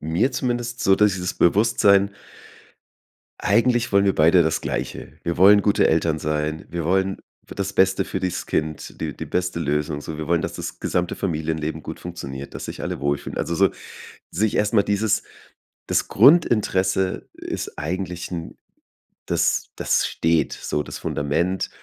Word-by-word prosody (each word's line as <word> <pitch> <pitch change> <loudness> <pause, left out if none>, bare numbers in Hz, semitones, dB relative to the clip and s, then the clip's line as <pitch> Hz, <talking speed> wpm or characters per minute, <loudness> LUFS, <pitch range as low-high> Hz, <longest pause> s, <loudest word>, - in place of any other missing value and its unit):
mir 85 - 0
zumindest, 120 -1 -2
so 95 - +5
das 105 -2 +4
dieses 90 0 -3
Bewusstsein 100 +1 +4 1.3
Eigentlich 120 +2 +2
wollen 100 0 +4
wir 95 - +3
beide 85 +3 +5
das 80 0 0
Gleiche. - - -4
Wir 85 - -2
wollen 100 +3 +7
gute 105 0 +3
Eltern 80 -1 +1
sein. 75 +1 -2
Wir 85 -1 -3
wollen 95 +2 +1 0.3
f - - -10
das 100 0 -3
Beste 95 0 +3
für 95 - -3
dieses 90 -1 -3
Kind, 75 -1 -3
die 75 -4 -3
die - - -6
beste 90 -2 -2
Lösung, 75 -1 -1
so. 75 +1 -6
Wir 80 - -5
wollen, 85 -1 +1
dass - - -4
das - - -6
gesamte 90 0 -1
Familienleben 80 -3 -2
gut - - -7
funktioniert, 70 -6 -7
dass - - -6
sich - - -7
alle - - -3
wohlfühlen. 70 0 -2
Also 85 - -1
so 95 +2 +3 0.6
sich 105 +3 0
erst 105 +2 +1
mal 100 -2 +5
dieses 105 +1 +1 0.6
das - - 0
Grundinteresse 100 - +3
ist - - -6
eigentlich 90 +3 -3
'n 85 -2 -6 0.7
das - - +1
das - - +1
steht 80 0 +1
so 75 - -2
das - - -8
Fundament, 85 +6 -1
90 Hz, 160 wpm, -22 LUFS, 80-100 Hz, 1.3 s, wollen